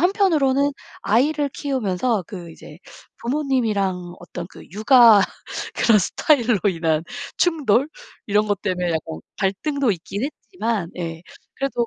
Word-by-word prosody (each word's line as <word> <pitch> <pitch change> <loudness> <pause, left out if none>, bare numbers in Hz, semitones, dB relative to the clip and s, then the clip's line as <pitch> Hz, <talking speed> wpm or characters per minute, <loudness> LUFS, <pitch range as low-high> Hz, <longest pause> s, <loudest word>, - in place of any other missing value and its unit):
한편으로는 310 -8 +3 0.3
아이를 285 +7 +2
키우면서 230 - -1
그 175 -4 -8
이제 160 0 -13 0.4
부모님이랑 220 -10 -1
어떤 175 -1 -7
그 - - -13
육아 225 0 +7 0.5
그런 225 -2 +4
스타일로 240 - +2
인한 160 -3 0 0.3
충돌 295 -7 +2 0.4
이런 210 +1 +2
것 205 -2 0
때문에 180 -3 -1
약간 160 - -3 0.2
갈등도 255 +7 0
있긴 195 +6 -5
했지만 230 - -3
예 165 -2 -5 0.3
그래도 270 -3 -1
220 Hz, 280 characters per minute, -22 LUFS, 185-275 Hz, 0.5 s, 육아